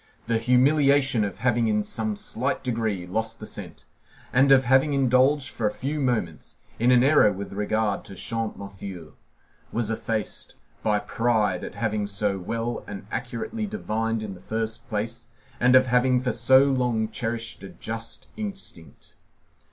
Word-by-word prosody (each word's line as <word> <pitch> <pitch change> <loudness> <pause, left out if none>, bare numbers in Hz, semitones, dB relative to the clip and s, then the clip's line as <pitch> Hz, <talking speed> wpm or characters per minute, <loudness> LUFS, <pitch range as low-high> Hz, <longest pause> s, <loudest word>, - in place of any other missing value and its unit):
The 115 -1 +1
humiliation 135 0 +4
of 100 -3 -3
having, 120 0 +1
in 105 -1 +1
some 110 0 -1
slight 125 +6 -1
degree, 110 -7 -1
lost 110 +5 -2
the - - -7
scent, - - -8 0.5
and 135 +2 +5
of 135 -1 +6
having 135 +3 +4
indulged, 130 +1 +3
for 110 - -1
a - - 0
few 145 +7 -3
moments, 115 - -2 0.2
in 120 +2 +3
an 125 -1 +6
error 135 -6 +5
with 100 0 -6
regard 105 0 0
to 95 - -8
Champmathieu, 100 -7 -5 0.6
was 115 -2 -1
effaced 110 -1 -3 0.3
by 105 -1 +2
pride 110 -4 0
at - - -7
having 105 -2 -1
so 100 -1 -1
well 115 +5 -3
and 100 -1 -7
accurately 125 - -3
divined 115 - -2
in 105 -2 -5
the 90 - -12
first 110 +4 -4
place, 115 +2 -3 0.3
and 125 +1 +5
of 130 0 +7
having 125 0 +3
for 125 0 -1
so 130 +4 +5
long 125 -5 +1
cherished 115 0 -4
a 95 - -7
just 115 +1 -5
instinct. 195 - -8
115 Hz, 155 wpm, -25 LUFS, 105-130 Hz, 0.6 s, of